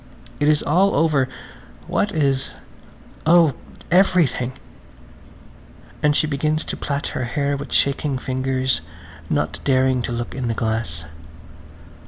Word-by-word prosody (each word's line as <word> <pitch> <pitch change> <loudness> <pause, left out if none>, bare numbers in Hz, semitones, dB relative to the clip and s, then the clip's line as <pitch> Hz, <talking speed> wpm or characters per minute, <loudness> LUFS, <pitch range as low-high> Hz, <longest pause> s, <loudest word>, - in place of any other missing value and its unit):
It 145 - +2
is 150 -1 +3
all 185 +6 +3
over! 150 -5 +2 0.6
What 205 - 0
is? 140 -5 0 0.7
Oh, 165 -3 +6 0.4
everything! 170 -9 +3 1.5
And 150 -1 +3
she - - +3
begins 155 +1 -1
to - - -4
plait 140 0 -3
her 130 - -2
hair 140 +3 -1
with 140 +1 -7
shaking 140 0 +1
fingers, 130 0 -1 0.5
not - - -1
daring 130 -1 +2
to 120 - -4
look 120 0 -4
in 130 -2 -3
the 115 - -1
glass. 110 -9 -2
140 Hz, 125 wpm, -21 LUFS, 130-155 Hz, 1.5 s, Oh